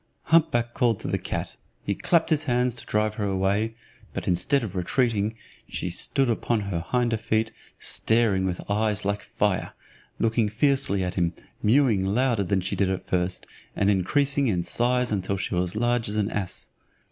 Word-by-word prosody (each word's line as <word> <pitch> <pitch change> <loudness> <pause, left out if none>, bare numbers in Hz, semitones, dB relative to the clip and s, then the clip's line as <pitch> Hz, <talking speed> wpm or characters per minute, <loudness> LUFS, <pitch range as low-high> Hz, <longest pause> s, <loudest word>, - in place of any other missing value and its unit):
Hump 165 0 +4
back 120 -4 -1
called 115 -4 +1
to - - -4
the - - -1
cat, - - -4 0.3
he 100 - 0
clapped 165 - +1
his 155 0 +2
hands 125 -2 +1
to 120 - -8
drive 105 0 +1
her 100 - 0
away, 100 +4 0 0.4
but - - -4
instead 115 +10 +2
of 100 -3 -5
retreating, 110 +2 +1 0.3
she 90 - -3
stood 135 - +1
upon 115 -1 0
her 95 -5 -3
hinder 120 -2 +2
feet, 110 0 0 0.3
staring 110 -4 +2
with 90 -1 -2
her - - -10
eyes 105 -1 0
like 100 +1 0
fire, 105 -4 0 0.4
looking 115 -1 +1
fiercely 125 -4 +2
at 90 - -2
him, 85 -1 0 0.3
mewing 115 -3 +3
louder 115 +2 +1
than 95 0 0
she 90 - -2
did 100 -2 +1
at 95 - -3
first, 90 0 -1 0.3
and 100 0 +3
increasing 140 +8 +2
in 90 -6 +1
size 125 +3 +1
till 100 +2 -2
she 95 - -3
was 90 0 0
as - - -14
large 120 0 +1
as 105 - -3
an 105 0 0
ass. 100 -3 -4
110 Hz, 185 wpm, -25 LUFS, 95-120 Hz, 0.4 s, Hump